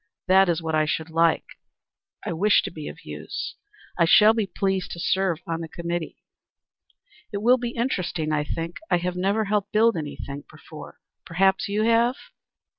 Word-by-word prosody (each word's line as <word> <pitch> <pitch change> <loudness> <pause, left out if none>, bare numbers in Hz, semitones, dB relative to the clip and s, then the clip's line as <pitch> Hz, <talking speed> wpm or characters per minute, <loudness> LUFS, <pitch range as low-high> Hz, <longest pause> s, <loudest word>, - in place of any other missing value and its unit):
"That 190 0 +5
is 170 -1 0
what 160 0 -2
I 155 0 +3
should 160 +1 -3
like. 165 0 +2 0.8
I 185 - -2
wish 205 +6 +3
to - - -5
be 155 -2 -8
of - - -10
use. - - -6 0.5
I 170 - +5
shall 210 +6 +7
be 220 -3 -1
pleased 190 -1 -1
to 170 - -8
serve 185 -2 0
on 165 0 -3
the 165 - -5
committee." 170 0 -5 1.1
"It 205 - -3
will 250 +2 +5
be 240 0 -4
interesting, 180 -10 -1
I 150 -1 +1
think. 165 +3 -5
I - - +3
have 180 +1 -3
never 200 +4 0
helped 205 0 -1
build 225 +1 +4
anything 145 -2 -6
before. - - -12 0.2
Perhaps 190 +4 +1
you 210 +2 0
have?" 230 +2 +3
180 Hz, 175 wpm, -24 LUFS, 165-210 Hz, 1.1 s, shall